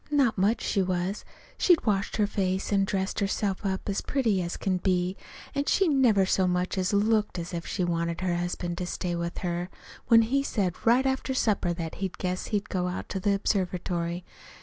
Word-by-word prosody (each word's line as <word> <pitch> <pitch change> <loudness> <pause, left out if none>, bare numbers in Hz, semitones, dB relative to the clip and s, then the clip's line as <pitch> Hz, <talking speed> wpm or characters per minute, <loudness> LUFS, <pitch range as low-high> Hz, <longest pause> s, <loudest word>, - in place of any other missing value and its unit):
Not 280 -6 +3
much 205 +4 +2
she 195 - +1
was! 185 +2 -1 0.4
She'd 355 -4 +4
washed 205 -3 0
her 210 - +3
face 190 -1 -1
an' 195 -1 +3
dressed 190 0 -1
herself 200 -1 -1
up 190 -1 -2
as 200 -1 -1
pretty 225 -9 +1
as 170 0 -3
could 185 -2 -1
be, 180 0 +1 0.4
an' 280 - -1
she 385 +4 +3
never 245 -10 +4
so 185 0 +2
much 180 +1 0
as 185 -1 0
looked 210 -1 +2
as 170 +1 -5
if 170 -1 -4
she 185 - -1
wanted 170 0 -1
her 180 -2 0
husband 175 0 -3
to 180 - -3
stay 175 -1 -2
with 170 0 -3
her, 175 +1 -2 0.4
when 230 -1 +7
he 270 +5 +1
said 200 -9 -1
right 250 +3 +5
after 265 0 0
supper 205 -7 +1
that 165 -2 -5
he 190 - 0
guessed 180 0 -2
he'd 210 0 -1
go 180 -3 -1
out 180 - -4
to 195 - -2
the 200 +1 +2
observatory. 180 -3 -1
190 Hz, 200 wpm, -27 LUFS, 180-215 Hz, 0.4 s, when